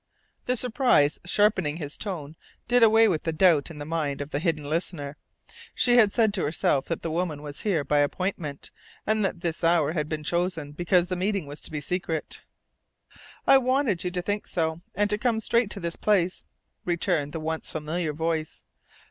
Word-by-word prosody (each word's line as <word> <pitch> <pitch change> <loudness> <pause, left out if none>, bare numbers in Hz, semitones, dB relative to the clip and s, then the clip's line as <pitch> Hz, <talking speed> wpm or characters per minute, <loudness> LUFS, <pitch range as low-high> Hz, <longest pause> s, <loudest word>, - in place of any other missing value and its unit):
The 250 0 +1
surprise 245 - +2
sharpening 190 -5 +2
his 150 -3 -5
tone 160 -7 -5 0.3
did 245 0 +3
away 225 0 +6
with 170 -7 0
the 165 - -2
doubt 160 -3 +3
in 160 - -10
the 145 - -6
mind 150 -3 -2
of 145 +1 -6
the 145 - -1
hidden 160 -3 -1
listener. 150 -2 -3 0.6
She 245 -1 +4
had 215 -4 +6
said 220 -2 +2
to 195 - 0
herself 145 -2 +1
that 165 - -3
the 165 - -2
woman 160 -3 -2
was 145 -1 -8
here 180 -8 0
by 145 +1 +2
appointment, 150 -1 -2 0.3
and 215 0 +1
that 185 -3 -1
this 170 -1 -2
hour 165 -1 +3
had 150 -2 -2
been 155 -1 -3
chosen 170 -3 -1
because 175 +3 +2
the 185 0 -3
meeting 195 -1 -1
was 145 +1 -7
to - - -5
be 150 -1 -3
secret. 165 0 -3 1.0
"I 270 - +7
wanted 255 -7 +1
you 180 - -1
to 180 0 -3
think 205 +2 -2
so, 160 -1 -1
and 205 +2 +2
to 210 - 0
come 235 -2 +1
straight 230 0 +1
to 205 - -3
this 170 -2 -4
place," 185 -4 +1 0.4
returned 170 -4 0
the 160 - -4
once 160 +1 -3
familiar 155 +1 -2
voice. 160 0 -3
170 Hz, 190 wpm, -26 LUFS, 155-200 Hz, 1.0 s, I